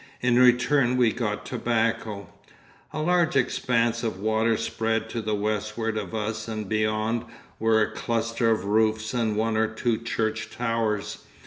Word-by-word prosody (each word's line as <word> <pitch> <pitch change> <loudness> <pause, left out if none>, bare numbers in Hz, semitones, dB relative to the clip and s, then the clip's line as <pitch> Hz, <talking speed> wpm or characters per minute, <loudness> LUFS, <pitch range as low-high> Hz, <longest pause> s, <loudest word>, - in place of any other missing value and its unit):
In 125 0 +3
return 125 +1 +4
we 120 -3 +4
got 105 -3 -3
tobacco. 115 -4 -1 0.7
A 155 - -3
large 175 -2 +2
expanse 120 -3 +1
of 110 -5 -3
water 110 +2 +1
spread 115 0 -2
to 115 - -3
the 110 0 -1
westward 105 +2 -2
of 105 -1 -4
us 110 +1 -3
and 110 -2 -4
beyond 110 +2 0 0.4
were 110 -1 +3
a - - -2
cluster 115 0 -1
of 110 -4 +1
roofs 110 +2 +1
and 115 -3 0
one 110 0 +1
or 110 0 +2
two 110 +1 -1
church 115 -1 -2
towers. 115 -3 -2
115 Hz, 150 wpm, -25 LUFS, 110-115 Hz, 0.7 s, return